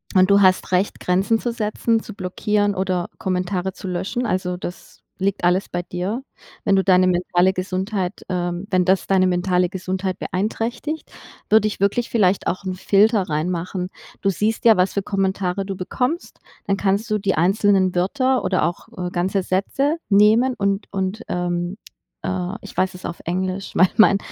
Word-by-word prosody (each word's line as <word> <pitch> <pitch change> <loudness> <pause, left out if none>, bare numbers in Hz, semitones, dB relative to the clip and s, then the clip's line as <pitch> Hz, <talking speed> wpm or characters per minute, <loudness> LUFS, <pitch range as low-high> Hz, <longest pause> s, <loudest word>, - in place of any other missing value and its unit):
und 185 +1 +5
du 200 - +6
hast 185 -1 +3
Recht 185 +2 +1
Grenzen 190 +5 +2
zu 240 - -2
setzen, 225 +1 0
zu 215 - -10
blockieren 205 +2 0
oder 185 -2 -1
Kommentare 185 0 -1
zu 190 - -8
löschen. 190 +8 -2
Also, 185 -3 -1
das 180 0 -9 0.2
liegt 195 -1 -1
alles 180 +2 +2
bei 175 0 -3
dir. 185 +8 -3 0.4
Wenn 200 - +3
du 190 - +3
deine 185 -1 +5
mentale 180 +1 +2
Gesundheit, 185 +1 -3
ähm 175 0 -2
wenn 185 -1 +3
das 190 +1 +2
deine 190 -1 +3
mentale 180 0 +1
Gesundheit 185 0 -3
beeinträchtigt, 230 +10 -3 0.4
würde 215 0 +5
ich 210 - -5
wirklich 200 +5 +1
vielleicht 200 -4 +2
auch 185 +3 -2
‘n 185 - -2
Filter 205 +3 +3
reinmachen. 180 +4 -2 0.3
Du 195 - +2
siehst 215 +6 -1
ja, 225 -3 +7
was 185 +1 +2
für 200 - -1
Kommentare 195 -1 -1
du 195 0 -4
bekommst, 250 - -3 0.3
dann 195 -1 0
kannst 200 +3 0
du 215 - +2
die 195 -1 0
einzelnen 190 +2 +3
Wörter 255 +6 +1
oder 185 0 +1
auch, 170 +2 -2
äh, 180 -1 -3
ganze 185 +2 0
Sätze 270 - 0
nehmen 220 +5 +5
und 200 0 0
und, 190 +3 -2
ähm, 175 +1 -2 0.5
äh 185 +1 -2
ich 200 - -11
weiß 185 +1 +1
es 180 - -12
auf 170 - -5
Englisch, 185 +2 -2
weil 185 - +5
mein 210 -2 +6
190 Hz, 175 wpm, -21 LUFS, 180-205 Hz, 0.5 s, ja